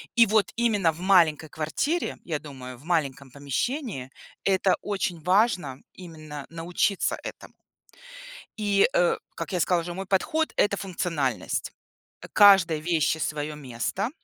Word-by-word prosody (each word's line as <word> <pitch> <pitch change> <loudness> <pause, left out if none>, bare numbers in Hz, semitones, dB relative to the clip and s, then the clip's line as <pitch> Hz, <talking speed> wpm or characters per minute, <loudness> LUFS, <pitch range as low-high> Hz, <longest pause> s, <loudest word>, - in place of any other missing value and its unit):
И 235 -1 +7
вот 215 0 +2
именно 210 -8 +2
в 165 +3 -12
маленькой 165 -5 +4
квартире, 220 - -2
я 155 -4 -3
думаю, 130 -4 -9
в - - -18
маленьком 140 -6 -1
помещении 140 - -3 0.3
это 190 -1 +3
очень 190 -5 -3
важно- 180 - +2 0.2
именно 155 -5 -9
научиться 170 +4 0
этому. - - -9 1.1
И, 205 0 +3
э, 175 -1 +3 0.2
как 165 - -5
я 180 - 0
сказала 175 0 +2
уже, 175 +1 -6
мой 195 +2 -5
подход- 310 +12 0
это 200 -1 +2
функциональность. 165 - -2 0.5
Э, - - -9
каждой 190 -6 +6
вещи 160 -1 +1
свое 150 -1 -3
место. 145 - -3
170 Hz, 135 wpm, -26 LUFS, 150-195 Hz, 1.1 s, И